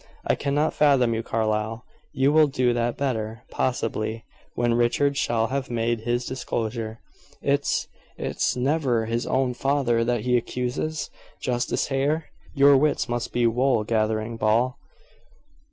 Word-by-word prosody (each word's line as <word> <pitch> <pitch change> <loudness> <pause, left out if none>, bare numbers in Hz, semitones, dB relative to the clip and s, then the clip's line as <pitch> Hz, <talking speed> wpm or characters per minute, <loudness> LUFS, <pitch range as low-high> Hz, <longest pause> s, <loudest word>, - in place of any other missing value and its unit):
"I - - +3
cannot 145 +2 0
fathom 135 -5 +3
you, 110 - -1
Carlyle." 110 0 -1 0.3
"You 135 +3 +2
will 155 -1 +6
do 125 -3 +1
that 120 0 -1
better, 115 -4 -2
possibly, 115 -2 -2 0.3
when 120 -1 +1
Richard 120 +4 +2
shall 115 -4 0
have 135 0 -2
made 115 -1 0
his 120 +2 -1
disclosure." 115 -3 -3 0.4
"It's - - +1 0.3
it's - - -1
never 125 -3 +1
his 115 +2 -2
own 130 -1 +1
father 125 -3 +1
that 120 -1 0
he 125 +1 +2
accuses? 125 +6 -3 0.3
Justice 120 -1 -1
Hare?" 145 +4 0 0.2
"Your 140 0 +7
wits 150 0 +1
must 120 -1 -3
be 120 -1 +1
wool 120 0 +2
gathering, 110 +1 -1
Ball." 115 +4 +2
120 Hz, 135 wpm, -25 LUFS, 115-135 Hz, 0.4 s, Your